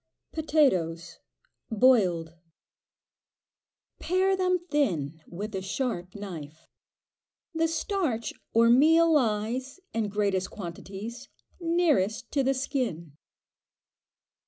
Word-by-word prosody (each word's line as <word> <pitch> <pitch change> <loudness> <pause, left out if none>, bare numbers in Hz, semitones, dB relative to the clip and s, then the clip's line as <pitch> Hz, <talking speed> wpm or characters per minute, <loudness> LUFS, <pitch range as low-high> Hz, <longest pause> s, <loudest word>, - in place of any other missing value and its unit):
Potatoes 180 - +1 0.5
(boiled). 200 -9 +3 1.7
Pare 375 +2 +2
them 365 -1 +2
thin 165 - 0
with 205 +5 -6
a 190 - -2
sharp 190 -3 -3
knife. 165 -6 -8 0.9
The 325 0 +2
starch 325 - -1 0.2
or 230 +1 +5
meal 325 +6 +5
lies, 250 - 0
in 225 -2 -1
greatest 200 -2 0
quantities, 200 +6 -8 0.3
nearest 290 - +1
to 280 - +1
the 270 +1 +1
skin. 235 - -3
225 Hz, 85 wpm, -27 LUFS, 185-295 Hz, 1.7 s, or